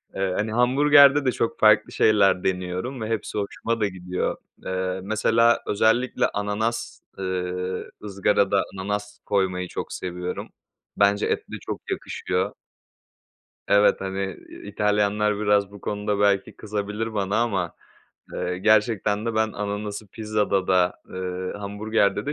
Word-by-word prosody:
Eee, 95 Hz, -1 st, 0 dB
hani 110 Hz, +1 st, -1 dB
hamburgerde 140 Hz, +4 st, +6 dB
de 130 Hz, -, +3 dB
çok 115 Hz, -, -2 dB
farklı 110 Hz, -1 st, +5 dB
şeyler 100 Hz, -4 st, +3 dB
deniyorum 95 Hz, +7 st, -2 dB
ve 110 Hz, -, -3 dB
hepsi 110 Hz, -1 st, -3 dB
hoşuma 115 Hz, +3 st, -2 dB
da 105 Hz, -, +3 dB
gidiyor. 90 Hz, -1 st, -3 dB, 0.3 s
Eee, 95 Hz, 0 st, -2 dB
mesela 115 Hz, +3 st, +3 dB
özellikle 110 Hz, +5 st, +2 dB
ananas, 105 Hz, +3 st, -2 dB, 0.2 s
ııı, 90 Hz, 0 st, -3 dB
ızgarada 100 Hz, 0 st, +2 dB
ananas 105 Hz, +1 st, -4 dB
koymayı 95 Hz, -3 st, 0 dB
çok -, -, -6 dB
seviyorum. 90 Hz, 0 st, -5 dB, 0.5 s
Bence 100 Hz, +1 st, +3 dB
etle 430 Hz, -, -3 dB
çok -, -, -4 dB
yakışıyor. 385 Hz, -, -2 dB, 1.2 s
Evet, 100 Hz, +1 st, +4 dB
hani, 95 Hz, 0 st, -3 dB, 0.3 s
İtalyanlar 105 Hz, 0 st, +1 dB
biraz 100 Hz, -1 st, +2 dB
bu 100 Hz, -, -11 dB
konuda 105 Hz, 0 st, -2 dB
belki 100 Hz, -1 st, +2 dB
kızabilir 105 Hz, +1 st, -4 dB
bana 100 Hz, 0 st, 0 dB
ama, 95 Hz, -7 st, -1 dB, 0.6 s
eee, 90 Hz, 0 st, -3 dB
gerçekten 110 Hz, +1 st, +2 dB
de 115 Hz, -, -1 dB
ben 110 Hz, 0 st, +1 dB
ananası 105 Hz, 0 st, -4 dB
pizzada 105 Hz, -2 st, -1 dB
da, 90 Hz, -1 st, +3 dB
ııı, 95 Hz, +1 st, -4 dB
hamburgerde 105 Hz, +1 st, 0 dB
de 150 Hz, -, -1 dB
105 Hz, 125 wpm, -24 LUFS, 95-110 Hz, 1.2 s, hamburgerde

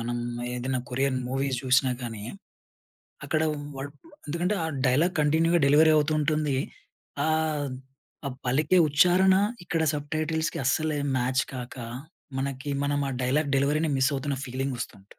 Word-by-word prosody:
మనం 120 Hz, +1 st, -2 dB, 0.4 s
ఏదన్నా 130 Hz, +1 st, -2 dB
Korean 135 Hz, +1 st, 0 dB
movies 135 Hz, 0 st, -1 dB
జూసినా 130 Hz, 0 st, +3 dB
కానీ, 115 Hz, -3 st, -5 dB, 1.0 s
అక్కడ 155 Hz, -, 0 dB, 0.4 s
వాడు 135 Hz, +1 st, -5 dB, 0.4 s
ఎందుకంటే 170 Hz, +6 st, 0 dB
ఆ -, -, 0 dB, 0.2 s
డైలాగ్ 155 Hz, +9 st, +2 dB
కంటిన్యూ‌గా 165 Hz, +3 st, +3 dB
డెలివరీ 155 Hz, +3 st, +6 dB
అవుతూ 155 Hz, +1 st, +2 dB
ఉంటుంది. 150 Hz, -2 st, +1 dB, 0.7 s
ఆహ్, 155 Hz, -2 st, 0 dB, 0.6 s
ఆ -, -, 0 dB, 0.2 s
పలికే 155 Hz, +8 st, +3 dB
ఉచ్చారణ 180 Hz, +6 st, +5 dB, 0.3 s
ఇక్కడ 165 Hz, -2 st, 0 dB
సబ్ 145 Hz, 0 st, -5 dB
టైటిల్స్‌కి 160 Hz, +1 st, -1 dB
అస్సలేం 145 Hz, +1 st, 0 dB
మ్యాచ్ 130 Hz, +2 st, +1 dB
కాక, 125 Hz, -1 st, -7 dB, 0.6 s
మనకి 140 Hz, +1 st, -3 dB
మనం 145 Hz, 0 st, 0 dB
ఆ -, -, -3 dB
డైలాగ్ 140 Hz, +3 st, +1 dB
డెలివరీ‌ని 150 Hz, +3 st, +1 dB
మిస్ 135 Hz, +2 st, +3 dB
అవుతున్న 140 Hz, 0 st, -2 dB
ఫీలింగ్ 130 Hz, +1 st, -3 dB
వస్తుంటు 100 Hz, -5 st, -7 dB
145 Hz, 135 wpm, -27 LUFS, 130-155 Hz, 1.0 s, డెలివరీ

